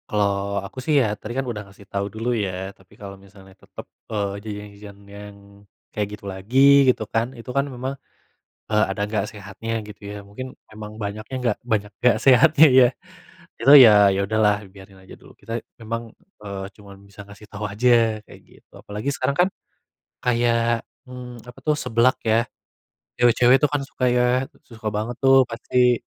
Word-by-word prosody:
Kalau 100 -1 -1
aku, 100 - -12
sih, 150 +4 0
ya, 110 -4 0
tadi, 105 +2 -8
kan, 135 - -1
udah 115 -4 -5
ngasih 100 +1 -17
tahu 100 0 -2
dulu, 115 +4 -3
ya, 95 -3 -3
tapi 95 0 -24
kalau 100 -3 -9
misalnya 95 -1 -17
tetap, - - -12 0.3
eee, 100 -2 -2
jajan-jajan 105 -1 -9
yang 100 0 -11 0.6
kayak 105 -1 -2
gitu - - -17
lagi, 100 +7 -2 0.3
gitu, 115 - -5
kan, 115 +3 -1
itu, 115 - -12
kan, 140 0 +2
memang, 130 +2 -5 0.8
eee, 105 0 +3
ada 95 - -4
nggak 105 -2 -1
sehatnya, 105 +2 -8
gitu, 105 -1 -12
ya, 105 - -7
mungkin 130 +6 -8 0.2
emang 105 0 -9
banyaknya 105 +4 -6
nggak 120 -4 0
banyak 105 -3 -1
nggak 125 -3 +4
sehatnya, 150 +4 +6
ya. 130 -1 +6 0.7
Itu, 135 +4 +5
ya, 105 -5 +8
ya 95 - -1
udah, 110 +2 -1
lah, 105 0 +4
biarin 95 0 -16
aja 95 - -13
dulu. - - -17
Kita 115 +1 -5 0.2
emang, 115 0 -5 0.3
eee, 100 -2 -6
cuman 100 -1 -14
bisa 100 0 -12
ngasih 100 +1 -14
tau 105 0 -6
aja, 115 +1 +2
kayak - - -15
gitu. - - -24
Apalagi 105 +7 -4
sekarang 140 - -1
kan - - -2 0.8
kayak, 115 -1 +1 0.3
mmm, 125 -1 -9
apa 125 - -12
tuh, 150 - +2
seblak 120 +1 +2
ya. 115 +1 +3 0.8
Cewek-cewek 120 +1 +5
tuh - - +6
kan 145 - 0
suka 130 -1 -3
ya, 125 +1 +2 0.2
suka 115 -2 -8
banget, 110 +4 -3
tuh, 135 0 +6
pasti. 125 +1 +1
110 Hz, 175 wpm, -22 LUFS, 100-125 Hz, 0.8 s, ya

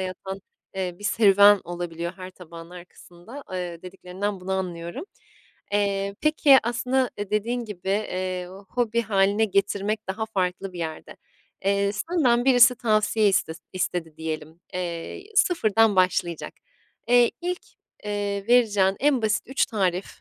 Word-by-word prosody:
yatan, 190 +1 -5 0.3
eee, 185 -2 -3
bir 205 - -12
serüven 205 -2 +6
olabiliyor 170 0 -5
her 185 0 -8
tabağın 170 -2 -12
arkasında, 180 +7 -12
eee, 175 -2 -5
dediklerinden 190 +2 -5
bunu 190 +1 -4
anlıyorum. 180 - -4 0.7
Eee, 200 -1 0
peki, 300 -3 +5
aslında, 250 +2 0
eee, 205 -1 -5
dediğin 235 +3 -1
gibi, 190 -3 -8
eee, 185 -3 -2 0.2
hobi 235 -1 0
hâline 200 +1 +2
getirmek 200 +1 -1
daha 220 +3 -3
farklı 185 -2 -2
bir 175 - -9
yerde. 160 -2 -6 0.5
Eee, 200 0 +1
senden 245 -1 +1
birisi 250 -1 +6
tavsiye 215 -1 +2
istes 165 -4 0
istedi 175 -3 -3
diyelim. 160 +1 -6
Eee, 175 - -5
sıfırdan 225 - +3
başlayacak. 180 -2 0 0.5
Eee, 245 -1 +5
ilk, 355 +1 -3 0.4
eee, 205 -1 -2
vereceğin 205 -6 +4
en 275 -4 +2
basit 215 -1 +1
3 265 +2 +1
tarif 190 -5 -1
200 Hz, 130 wpm, -24 LUFS, 180-225 Hz, 0.7 s, serüven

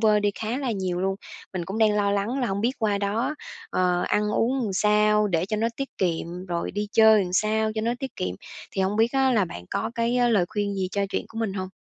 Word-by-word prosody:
vơi 215 -2 +4
đi 205 0 +2
khá 225 +4 -2
là 265 -4 -2
nhiều 185 -3 -2
luôn. 190 +1 0 0.4
Mình 175 -2 -3
cũng 195 +5 -4
đang 215 -1 +4
lo 200 -1 +2
lắng 205 +7 0
là 245 - +1
hổng 195 0 -2
biết 240 +4 +1
qua 210 -3 +1
đó, 215 +8 -1 0.4
ờ, 180 -1 +1
ăn 210 0 +1
uống 255 +5 +1
làm 210 -5 -2
sao 210 +1 +3
để 170 0 0
cho 215 0 -1
nó 225 +2 +1
tiết 275 0 -3
kiệm, 175 0 -2
rồi 170 -1 -2
đi 205 +2 -2
chơi 220 -2 +6
làm 180 - -5
sao 215 +2 +2
cho 220 - -1
nó 230 +2 0
tiết 270 -1 -6
kiệm. 90 0 -2 0.4
Thì 195 - 0
hông 195 +2 0
biết 225 +3 +3
á 265 -1 +3
là 210 -5 +3
bạn 90 - -8
có 220 +3 -1
cái, 235 +1 +1
ơ, 245 -1 +3
lời 205 -6 +3
khuyên 205 -1 -2
gì 190 -1 -1
cho 200 -1 0
chuyện - - -2
của 225 - -8
mình 220 -4 -1
hông? 185 -1 -4
210 Hz, 265 wpm, -25 LUFS, 190-225 Hz, 0.4 s, chơi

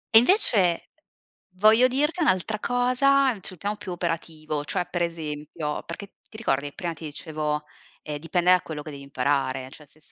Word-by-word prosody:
E - - +12
invece 225 - +4 0.6
voglio 215 +6 +6
dirti 295 +7 0
un'altra 215 - +1
cosa 255 +3 +3
sul 185 - -7
piano 205 +4 -3
più 200 -3 -6
operativo, 160 -3 -3
cioè 180 - -1
per 175 0 -3
esempio, 155 -2 -4
perché 195 +4 -9
ti - - -18
ricordi 145 -11 0
che 145 - -9
prima 175 -2 -3
ti 160 0 -9
dicevo, 150 0 -3 0.4
ehm: 150 -1 -5
"Dipende 175 +3 +2
da 185 - +6
quello 150 -2 -6
che 155 - -8
devi 140 -1 -9
imparare", 135 -1 -1
cioè 150 +3 -13
se 150 +2 -22
s - - -18
170 Hz, 180 wpm, -25 LUFS, 150-215 Hz, 0.6 s, E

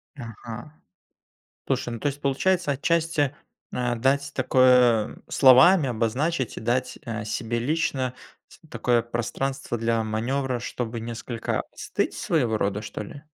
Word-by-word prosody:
Ага. 120 +3 -9 0.9
Слушай, - - -1
ну 115 - -5
то - - -1
есть 145 0 -3
получается, 170 +5 +1
отчасти, 155 -1 +1 0.4
э, 120 -1 -1
дать 135 +4 +1
такое 125 -3 +4
словами 140 +4 +6
обозначить 125 +5 -1
и - - -5
дать, 125 +3 -1
э, 115 -2 -4
себе 115 +2 -2
лично 130 -1 -1 0.4
с - - -17
такое 120 -1 +1
пространство 120 +2 -3
для 115 0 0
маневра, 125 +4 -1
чтобы 115 0 -4
несколько 115 0 -3
остыть - - -2
своего 120 -9 0
рода, 100 0 -1
что 105 - -6
ли? 140 +8 -11
125 Hz, 130 wpm, -25 LUFS, 115-140 Hz, 0.9 s, словами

